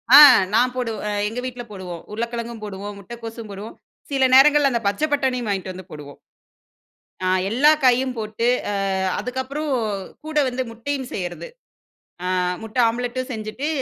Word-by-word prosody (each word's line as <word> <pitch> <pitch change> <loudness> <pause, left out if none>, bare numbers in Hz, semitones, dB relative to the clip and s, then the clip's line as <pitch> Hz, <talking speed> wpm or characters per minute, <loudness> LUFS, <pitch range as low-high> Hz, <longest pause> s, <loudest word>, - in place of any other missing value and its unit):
ஆ! - - +13 0.4
நான் 250 +3 +3
போடுவ 240 -3 -2 0.3
எங்க 225 +4 -4
வீட்ல 250 -1 -5
போடுவோம். 180 -4 -7
உருளக்கெழங்கும் 235 +1 -4
போடுவோம், 205 0 -6
முட்டைக்கோசும் 230 +1 -8
போடுவோம். 200 +3 -8 0.3
சில 270 -1 +3
நேரங்கள்ல 290 +1 +6
அந்த 235 -2 0
பச்சை 205 +10 +1
பட்டாணியும் 255 -4 0
வாங்கிட்டு 190 -2 -2
வந்து 185 0 -10
போடுவோம். 145 -2 -10 1.0
அ 185 - -2 0.2
எல்லா 270 +7 +5
காயும் 255 0 +3
போட்டு, 215 +1 -2 0.4
அ - - 0 0.3
அதுக்கப்பறம், 260 +6 -3 0.5
கூட 310 0 -7
வந்து 255 +1 -2
முட்டையும் 260 +3 -4
சேர்றது. 180 - -5 0.8
அ - - -1 0.3
முட்டை 225 +2 -4
ஆம்லெட்டும் 245 +2 -3
செஞ்சுட்டு, 220 +6 -4
235 Hz, 140 wpm, -22 LUFS, 210-260 Hz, 1.0 s, ஆ